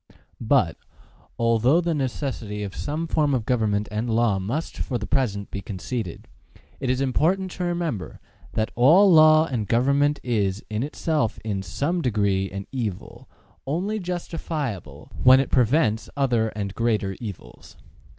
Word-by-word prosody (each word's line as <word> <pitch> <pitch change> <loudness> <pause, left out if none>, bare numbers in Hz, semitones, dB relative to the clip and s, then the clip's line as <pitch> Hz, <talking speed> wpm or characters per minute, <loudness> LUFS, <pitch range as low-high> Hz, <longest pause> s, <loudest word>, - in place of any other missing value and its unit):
But, - - +2 0.6
although 115 +6 +3
the 170 -1 0
necessity 125 -7 -3
of 100 -1 -6
some 155 +3 -3
form 150 -3 +1
of 115 -4 -2
government 105 -4 0
and 110 +3 -2
law 110 -3 +2
must 120 +13 -4
for 125 - -2
the 105 - -5
present 100 -3 -1
be 100 - -4
conceded, 100 0 -5 0.5
it 130 - -2
is 130 +1 +1
important 175 +8 +1
to 180 - -4
remember 170 - -3 0.3
that 110 0 -1
all 175 - +6
law 155 0 +7
and 120 -9 -3
government 140 +6 +2
is 105 -5 -1
in 105 +1 -1
itself 150 -3 -1
in 100 -3 -2
some 140 - -2
degree 100 -6 0
an 100 0 -6
evil, 110 -8 -5 0.4
only 190 +9 -1
justifiable 150 - -5
when 130 +1 +7
it 135 - -1
prevents 120 -3 +2
other 120 -5 +2
and 100 -2 -3
greater 105 -4 0
evils. 105 -6 -10
120 Hz, 145 wpm, -24 LUFS, 105-150 Hz, 0.6 s, law